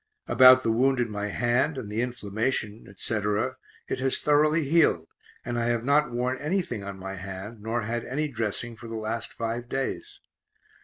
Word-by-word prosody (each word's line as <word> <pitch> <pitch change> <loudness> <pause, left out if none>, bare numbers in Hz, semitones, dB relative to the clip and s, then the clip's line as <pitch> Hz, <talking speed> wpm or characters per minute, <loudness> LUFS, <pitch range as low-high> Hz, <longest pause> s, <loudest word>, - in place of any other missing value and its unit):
About 130 0 +8
the 115 - +2
wound 130 +3 +2
in 120 -2 0
my 105 0 -3
hand 120 +8 +1
and 125 -5 -5
the 110 +2 0
inflammation, 110 -1 -2
etc., 105 +5 -1 0.3
it - - -3
has 130 0 +1
thoroughly 150 +2 +3
healed, 150 - +3 0.4
and 120 -1 -2
I 115 - 0
have 120 -1 0
not 145 +2 +3
worn 125 +2 -1
anything 150 - -2
on 100 -1 -6
my 95 0 -6
hand, 95 +3 -7
nor 115 +2 -2
had 115 +2 -2
any 150 +4 -2
dressing 115 -2 -3
for 115 +1 -11
the 115 - -6
last 110 +1 -3
five 115 +1 -4
days. 135 0 -3
120 Hz, 175 wpm, -27 LUFS, 105-130 Hz, 0.4 s, About